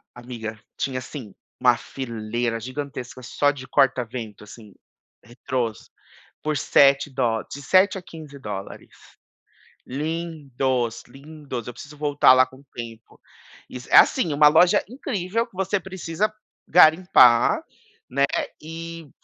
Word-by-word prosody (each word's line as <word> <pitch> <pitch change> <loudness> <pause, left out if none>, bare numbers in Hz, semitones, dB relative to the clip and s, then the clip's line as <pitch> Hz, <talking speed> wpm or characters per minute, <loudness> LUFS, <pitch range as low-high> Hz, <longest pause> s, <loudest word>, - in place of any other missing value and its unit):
amiga, 115 -3 -7 0.2
tinha, 130 -2 -2
assim, 125 -5 -9 0.3
uma 125 -2 +5
fileira 115 -2 -4
gigantesca 130 0 -7
só 145 +3 +1
de 135 -2 -8
corta-vento, 120 -6 -1
assim, 105 0 -14 0.5
retrôs, 120 -1 -4 0.5
por 155 -1 -1
sete 140 +1 +4
dó 115 -4 -1
de 140 - -9
7 190 +5 +3
a 190 - -7
15 155 -5 -12
dólares. 100 -5 -7 1.0
Lindos, 135 -5 -3
lindos! 140 -3 -9
Eu 120 - -6
preciso 150 +4 -12
voltar 145 -3 +5
lá 130 0 +5
com 130 +1 -17
tempo. 115 -1 -10 0.5
Isso 125 -1 -10
é - - +6
assim, 170 - +5
uma 150 +1 +6
loja 175 +6 +4
incrível 225 -2 -3
que 215 - -25
você 195 +1 0
precisa 190 +3 -3 0.3
garimpar, 160 - +5 0.5
né, 140 - +2 0.4
e 165 -1 -8
135 Hz, 120 wpm, -23 LUFS, 120-160 Hz, 1.0 s, é